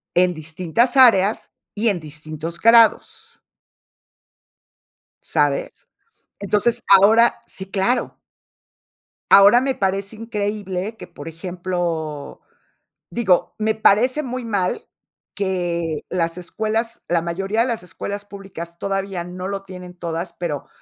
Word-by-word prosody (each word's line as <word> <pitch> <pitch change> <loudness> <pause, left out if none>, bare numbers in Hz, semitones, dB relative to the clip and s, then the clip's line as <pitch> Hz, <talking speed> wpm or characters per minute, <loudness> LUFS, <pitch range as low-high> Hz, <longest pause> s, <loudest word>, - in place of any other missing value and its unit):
en 180 0 +3
distintas 175 - -1
áreas 220 -5 +5 0.2
y 220 +2 +1
en 195 -4 -1
distintos 155 +2 -7
grados. 230 +1 +3 1.8
¿Sabes? - - -1 0.5
Entonces, 215 +4 +1 0.2
ahora 225 +4 +4
sí, 190 - -8
claro. 205 +6 0 1.1
Ahora 200 +5 +8
me 265 +1 0
parece 195 0 -2
increíble 210 -2 -4
que, - - -10
por 165 -3 -10
ejemplo, 170 -3 -4 0.7
digo, 190 -7 +1
me 220 0 0
parece 230 +6 +3
muy 255 -2 -5
mal 200 -5 -2 0.5
que 175 -5 -2
las 165 -1 -1
escuelas, 220 +5 -3
la 170 -1 +1
mayoría 195 +6 -1
de 240 - +1
las 230 -6 -3
escuelas 200 +3 -6
públicas, 195 -4 -9
todavía 195 -1 -3
no 180 +1 -7
lo 195 0 -4
tienen 180 -2 -10
todas, 170 0 -4
pero 165 -5 -5
195 Hz, 110 wpm, -21 LUFS, 175-220 Hz, 1.8 s, Ahora